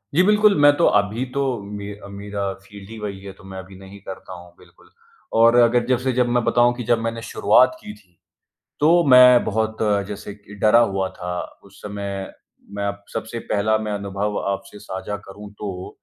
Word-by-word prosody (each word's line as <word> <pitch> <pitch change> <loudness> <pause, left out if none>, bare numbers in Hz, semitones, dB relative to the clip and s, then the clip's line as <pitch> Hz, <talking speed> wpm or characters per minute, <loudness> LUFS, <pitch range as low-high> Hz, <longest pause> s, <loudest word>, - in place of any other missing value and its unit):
जी 180 - +5
बिल्कुल। 210 +1 +4
मैं 145 0 +8
तो 170 - +3
अभी 105 +5 -1
तो 140 - +1 0.2
मे 100 0 -7 0.2
मेरा 100 0 -6 0.2
फ़ील्ड 100 0 -13
ही 115 - -9
वही 100 -2 -5
है 100 -1 -9
तो - - -16
मैं 95 0 -9
अभी 95 0 -12
नहीं 95 +1 -12
करता 95 -1 -9
हूँ 90 -1 -13
बिल्कुल। - - -21 0.5
और 115 +1 +6
अगर 120 0 +3
जैसे 130 +1 +1
जब 125 - +3
मैं 120 - +2
बताऊँ 120 +1 +3
कि 120 - -5
जब 115 +1 +1
मैंने 115 0 -3
शुरुआत 130 +2 +3
की 105 - -9
थी, 95 -5 -23 0.6
तो 170 +3 +4
मैं 125 -1 +7
बहुत 110 +1 -1 0.3
जैसे 100 0 -7
कि 105 -1 -15
डरा 110 +2 +6
हुआ 95 -4 0
था। 90 -1 -6 0.3
उस - - -18
समय 100 -1 -5 0.4
मैं 100 - -2
अब 100 0 -5
सबसे 115 +1 -5
पहला 110 +1 +1
मैं 110 -1 -4
अनुभव 100 0 -3
आपसे 100 +1 -7
साझा 100 0 -6
करूँ 100 +1 -10
तो 95 -3 -6
105 Hz, 190 wpm, -21 LUFS, 100-120 Hz, 0.6 s, मैं